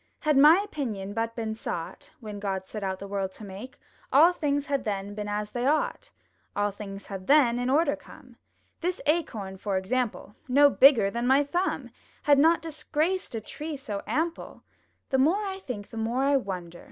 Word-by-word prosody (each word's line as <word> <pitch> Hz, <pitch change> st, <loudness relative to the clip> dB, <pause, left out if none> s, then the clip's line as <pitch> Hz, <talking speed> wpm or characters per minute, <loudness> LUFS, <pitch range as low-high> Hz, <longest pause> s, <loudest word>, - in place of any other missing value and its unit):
Had 305 Hz, -2 st, +2 dB
my 300 Hz, +6 st, +8 dB
opinion 215 Hz, -, -4 dB
but 230 Hz, +1 st, -2 dB
been 225 Hz, -2 st, -3 dB
sought, 170 Hz, -6 st, -6 dB
When 210 Hz, -2 st, -7 dB
God 190 Hz, -2 st, -3 dB
set 210 Hz, +1 st, -7 dB
out 190 Hz, -1 st, -2 dB
the 200 Hz, -, -8 dB
world 195 Hz, -1 st, -2 dB
to -, -, -12 dB
make, 210 Hz, +7 st, -9 dB, 0.3 s
All 325 Hz, +6 st, +7 dB
things 285 Hz, -4 st, -1 dB
had 280 Hz, -2 st, -1 dB
then 200 Hz, -1 st, -3 dB
been 210 Hz, 0 st, -5 dB
as 210 Hz, 0 st, -3 dB
they 245 Hz, +1 st, -1 dB
ought! 305 Hz, +2 st, 0 dB, 0.5 s
All 205 Hz, 0 st, +1 dB
things 200 Hz, 0 st, -8 dB
had 190 Hz, -2 st, -7 dB
then 255 Hz, -5 st, +5 dB
in 245 Hz, +1 st, -1 dB
order 310 Hz, +5 st, +3 dB
come! -, -, -16 dB, 0.4 s
This 360 Hz, +2 st, -2 dB
Acorn 225 Hz, -, -1 dB
for 195 Hz, 0 st, -2 dB
example, 215 Hz, +1 st, -2 dB
No 285 Hz, +2 st, +6 dB
bigger 245 Hz, -9 st, +6 dB
than 235 Hz, +2 st, -2 dB
my 270 Hz, +2 st, +5 dB
thumb, 350 Hz, +6 st, -2 dB, 0.3 s
Had 285 Hz, -2 st, +5 dB
not 325 Hz, +3 st, +4 dB
disgraced 320 Hz, +1 st, -2 dB
a 225 Hz, -, -3 dB
tree 300 Hz, +7 st, -6 dB
so 210 Hz, -7 st, -5 dB
ample. 330 Hz, +2 st, -3 dB, 0.5 s
The 265 Hz, -, +3 dB
more 355 Hz, +10 st, +3 dB
I 385 Hz, -1 st, -4 dB
think, 235 Hz, -, -7 dB
the 225 Hz, -, -8 dB
more 230 Hz, +4 st, 0 dB
I 280 Hz, +1 st, +3 dB
wonder! 180 Hz, -8 st, -3 dB
245 Hz, 190 wpm, -27 LUFS, 205-295 Hz, 0.5 s, my